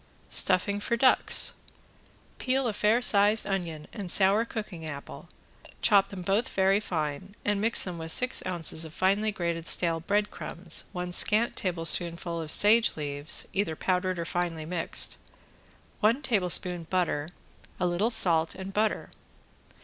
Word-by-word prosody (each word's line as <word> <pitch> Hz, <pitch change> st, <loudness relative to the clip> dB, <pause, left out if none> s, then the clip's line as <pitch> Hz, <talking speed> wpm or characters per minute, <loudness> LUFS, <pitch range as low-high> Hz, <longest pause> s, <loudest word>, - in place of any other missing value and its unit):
~STUFFING 195 Hz, +2 st, +2 dB
FOR 235 Hz, +3 st, -2 dB
DUCKS~ 255 Hz, +2 st, +3 dB, 0.9 s
Peel 260 Hz, 0 st, 0 dB
a 220 Hz, -, -2 dB
fair 215 Hz, +4 st, +1 dB
size 210 Hz, +1 st, +3 dB
onion 170 Hz, -6 st, -4 dB
and 200 Hz, -5 st, -6 dB
sour 200 Hz, +5 st, +4 dB
cooking 210 Hz, -8 st, -7 dB
apple, 145 Hz, -3 st, -9 dB, 0.5 s
chop 200 Hz, -3 st, +4 dB
them 190 Hz, -3 st, -8 dB
both 200 Hz, +6 st, 0 dB
very 195 Hz, +1 st, +2 dB
fine, 165 Hz, 0 st, -5 dB
and 205 Hz, -1 st, 0 dB
mix 225 Hz, +2 st, +4 dB
them 175 Hz, -3 st, -6 dB
with 160 Hz, 0 st, -5 dB
six 255 Hz, +7 st, +2 dB
ounces 165 Hz, -3 st, -1 dB
of 160 Hz, 0 st, -9 dB
finely 200 Hz, +3 st, +1 dB
grated 170 Hz, -4 st, -4 dB
stale 165 Hz, -2 st, +2 dB
breadcrumbs, 185 Hz, -2 st, -3 dB
one 180 Hz, -1 st, -5 dB
scant 215 Hz, +6 st, +2 dB
tablespoonful 170 Hz, -1 st, 0 dB
of 160 Hz, -, -7 dB
sage 220 Hz, +6 st, +4 dB
leaves 145 Hz, 0 st, 0 dB
either 195 Hz, -5 st, -1 dB
powdered 185 Hz, +1 st, -1 dB
or 170 Hz, -, -4 dB
finely 170 Hz, -3 st, -3 dB
mixed, 165 Hz, 0 st, -2 dB, 0.8 s
one 230 Hz, +7 st, +1 dB
tablespoon 180 Hz, -7 st, 0 dB
butter, 175 Hz, -5 st, -1 dB, 0.5 s
a 180 Hz, -, 0 dB
little 180 Hz, +6 st, 0 dB
salt 170 Hz, -8 st, +3 dB
and 190 Hz, +1 st, -8 dB
butter. 215 Hz, +1 st, -1 dB
185 Hz, 140 wpm, -27 LUFS, 170-210 Hz, 0.9 s, sour